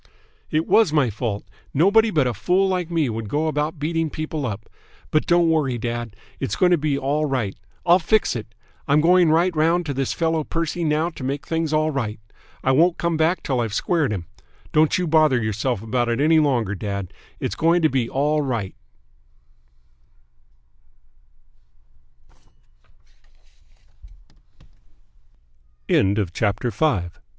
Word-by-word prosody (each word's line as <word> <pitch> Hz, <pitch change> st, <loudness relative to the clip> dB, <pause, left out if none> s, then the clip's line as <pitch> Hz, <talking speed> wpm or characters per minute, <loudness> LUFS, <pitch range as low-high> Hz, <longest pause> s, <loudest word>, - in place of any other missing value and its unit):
"It 155 Hz, +2 st, 0 dB
was 220 Hz, -8 st, +4 dB
my 145 Hz, -7 st, +2 dB
fault. 105 Hz, -1 st, -4 dB, 0.3 s
Nobody 205 Hz, +9 st, +4 dB
but 150 Hz, -9 st, +1 dB
a 125 Hz, -, 0 dB
fool 190 Hz, -, +1 dB
like 180 Hz, -3 st, -1 dB
me 165 Hz, -4 st, +1 dB
would 110 Hz, -2 st, -4 dB
go 150 Hz, +7 st, 0 dB
about 155 Hz, +1 st, -2 dB
beating 165 Hz, +2 st, -1 dB
people 155 Hz, -2 st, -4 dB
up. 110 Hz, -1 st, -6 dB, 0.4 s
But 155 Hz, -, +1 dB
don't 175 Hz, -1 st, +4 dB
worry, 150 Hz, -6 st, +1 dB
dad. 120 Hz, -2 st, -4 dB, 0.2 s
It's 100 Hz, -, -2 dB
going 180 Hz, -1 st, +3 dB
to 175 Hz, -, +5 dB
be 145 Hz, -2 st, 0 dB
all 145 Hz, +3 st, 0 dB
right. 125 Hz, -9 st, -2 dB, 0.3 s
I'll 175 Hz, +2 st, +5 dB
fix 210 Hz, +1 st, +1 dB
it. 110 Hz, -1 st, -7 dB, 0.3 s
I'm 145 Hz, +1 st, +4 dB
going 175 Hz, +1 st, +4 dB
right 170 Hz, +3 st, +2 dB
round 165 Hz, +3 st, +2 dB
to 145 Hz, -, -3 dB
this 135 Hz, 0 st, -2 dB
fellow 165 Hz, -1 st, 0 dB
Percy 165 Hz, +2 st, -3 dB
now 155 Hz, +2 st, 0 dB
to 145 Hz, -, -10 dB
make 140 Hz, +2 st, -3 dB
things 165 Hz, -1 st, -2 dB
all 155 Hz, 0 st, +1 dB
right. 115 Hz, -7 st, -3 dB, 0.4 s
I 130 Hz, -, +2 dB
won't 165 Hz, +6 st, +3 dB
come 170 Hz, -1 st, -1 dB
back 160 Hz, +3 st, +1 dB
till 130 Hz, -3 st, -1 dB
I've 115 Hz, -3 st, -2 dB
squared 160 Hz, -3 st, 0 dB
him. 95 Hz, -5 st, -4 dB, 0.5 s
Don't 155 Hz, 0 st, +3 dB
you 180 Hz, -, -1 dB
bother 155 Hz, -5 st, +3 dB
yourself 110 Hz, +1 st, -2 dB
about 120 Hz, +1 st, -1 dB
it 120 Hz, +1 st, -1 dB
any 160 Hz, +2 st, +4 dB
longer, 125 Hz, -9 st, +1 dB
dad. 100 Hz, -2 st, -5 dB, 0.3 s
It's -, -, -3 dB
going 165 Hz, +1 st, +2 dB
to -, -, +6 dB
be 125 Hz, -4 st, -1 dB
all 150 Hz, +3 st, +1 dB
right." 120 Hz, -7 st, -2 dB
150 Hz, 145 wpm, -22 LUFS, 120-165 Hz, 0.5 s, to